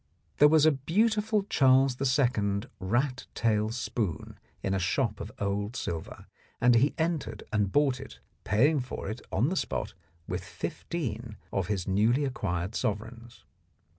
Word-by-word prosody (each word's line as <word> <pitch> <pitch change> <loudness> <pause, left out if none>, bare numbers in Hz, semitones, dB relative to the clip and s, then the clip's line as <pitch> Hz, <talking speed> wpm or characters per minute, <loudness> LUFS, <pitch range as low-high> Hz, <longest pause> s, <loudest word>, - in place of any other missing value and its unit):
There 150 - +8
was 155 0 +5
a 155 - +7
beautiful 210 - +1
Charles 135 -7 +4
II. 120 -7 +2 0.2
rat 125 +8 -1
tail 110 -2 +1
spoon 115 -5 -3 0.2
in 95 - 0
a 95 - +1
shop 105 +4 0
of 100 +1 -6
old 100 +3 -2
silver, 80 -8 -5 0.3
and 125 0 +5
he 130 +5 +3
entered 155 -10 -2
and 105 -2 +1
bought 140 -1 +2
it, 135 - -10 0.3
paying 140 - +3
for 125 -5 -5
it 110 - -7
on 115 +10 +2
the 185 - -1
spot 105 - -2 0.3
with - - -3
fifteen 120 -9 -5 0.2
of 95 -3 0
his 100 -4 -2
newly 110 +9 +3
acquired 95 -7 -2
sovereigns. 115 +3 -4
120 Hz, 145 wpm, -29 LUFS, 105-140 Hz, 0.3 s, There